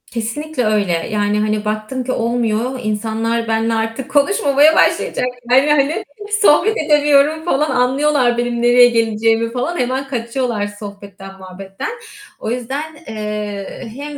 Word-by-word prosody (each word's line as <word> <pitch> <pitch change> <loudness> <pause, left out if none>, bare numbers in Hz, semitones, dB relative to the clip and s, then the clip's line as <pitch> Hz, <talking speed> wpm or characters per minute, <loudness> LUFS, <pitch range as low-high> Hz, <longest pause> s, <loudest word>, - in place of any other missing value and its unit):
Kesinlikle 250 +4 -3
öyle. 210 -3 +1 0.2
Yani, 210 0 0
hani, 215 0 -1
baktım 215 +5 -3
ki 255 - -3
olmuyor, 235 +1 -1
insanlar 225 +2 -2
benle 225 +1 0
artık 225 +4 -3
konuşmamaya 290 -1 +3
başlayacaklar 250 +1 +2
yani. 295 +1 +1 0.4
Sohbet 415 +4 +4
edemiyorum 295 +1 +3
falan, 300 -3 +1
anlıyorlar 255 0 +2
benim 240 0 -1
nereye 245 0 +6
geleceğimi 225 0 +1
falan. 255 +8 -3
Hemen 260 +2 -1
kaçıyorlar 235 -4 -2
sohbetten, 200 -2 -10
muhabbetten. 190 - -7 0.5
O 220 - -4
yüzden, 270 +6 -4
eee, 210 0 -5
hem, 290 +1 -7
240 Hz, 125 wpm, -17 LUFS, 215-275 Hz, 0.5 s, nereye